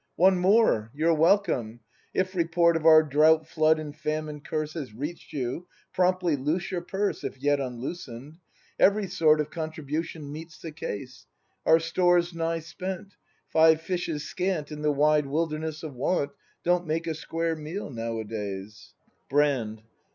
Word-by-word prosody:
] - - -49
One 190 -1 +5
more! 185 - +3
You're 165 +3 +3
welcome. 155 - +2 0.3
If 185 0 -1
report 170 -1 +3
Of 165 0 +1
our 155 -1 +8
drought 155 +2 +4
flood 155 -1 +3
and 150 -2 -6
famine 155 0 -3
curse 155 0 -3
Has 135 -10 -6
reach'd 150 +8 -6
you, 135 +6 -4 0.3
promptly 180 -3 +2
loose 155 +8 -2
your 180 -2 -2
purse 195 +3 -2
(If - - -5
yet 145 +2 +1
unloosen'd). 130 +2 -6 0.4
Every 205 +1 +4
sort 165 -5 +3
Of 150 - -2
contribution 155 -1 -4
meets 155 +1 -9
the 165 - -8
case. 130 -3 -7 0.4
Our 160 +1 +7
store's 175 +1 +2
nigh 165 0 -1
spent. 185 +4 -6 0.4
Five 160 0 +5
fishes 165 -4 -3
scant 180 -5 -2
In 150 0 -6
the 150 0 +2
wide 150 0 +3
wilderness 155 +1 -2
of 155 -3 -6
Want 140 +3 0 0.3
Don't 175 0 +1
make 160 +2 -1
a 165 - -1
square 165 +1 -2
meal 155 +4 -6
nowadays. 110 -4 -5 0.3
Brand. 130 -7 +1
155 Hz, 150 wpm, -27 LUFS, 145-170 Hz, 0.4 s, our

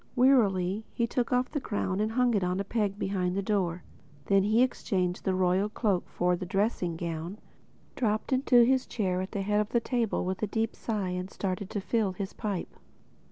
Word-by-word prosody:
Wearily 215 -6 +3
he 235 - +2
took 240 0 -1
off 250 +2 +1
his 290 - -1
crown 200 -4 -2
and 215 +1 0
hung 250 0 +3
it 200 -3 +1
on 180 +1 0
a - - 0
peg 205 -1 -1
behind 185 -2 -1
the 200 - 0
door. 185 -4 0 0.4
Then 195 -1 +4
he 215 +5 +4
exchanged 185 -8 -1
the 190 - +1
royal 185 +2 +2
cloak 205 -4 0
for 180 0 +1
the 175 - -6
dressing 185 -2 0
gown, 170 +3 -4 0.6
dropped 215 +1 0
into 255 -2 +5
his 260 +1 +2
chair 185 -5 -1
at 190 - -5
the 200 - -2
head 210 +1 +1
of 210 - -3
the 235 - +2
table 230 -5 -1
with 185 0 -3
a 215 - +1
deep 225 +2 -1
sigh 210 -5 -2
and 180 +1 -3
started 195 0 -3
to 205 - -3
fill 210 -2 0
his 195 +1 -5
pipe. 205 -5 -4
200 Hz, 205 wpm, -29 LUFS, 185-225 Hz, 0.6 s, into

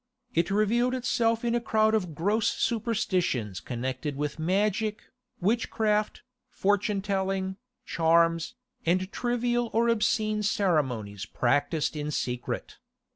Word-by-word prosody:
It 170 +2 +1
revealed 230 +5 +2
itself 235 -2 +1
in 235 - +1
a 240 - +1
crowd 220 -1 +2
of 180 -8 0
gross 205 +7 +1
superstitions 185 - -1
connected 130 +4 -4
with 150 +2 -3
magic, 210 +5 0 0.4
witchcraft, 215 +1 0 0.3
fortune 205 0 0
telling, 190 -1 -1 0.3
charms, 165 0 +2 0.3
and 185 +3 +1
trivial 240 -1 0
or 230 +2 +3
obscene 215 -1 +1
ceremonies 130 - 0
practised 145 +7 0
in 150 0 -3
secret. 125 -4 -3
195 Hz, 110 wpm, -28 LUFS, 160-220 Hz, 0.4 s, or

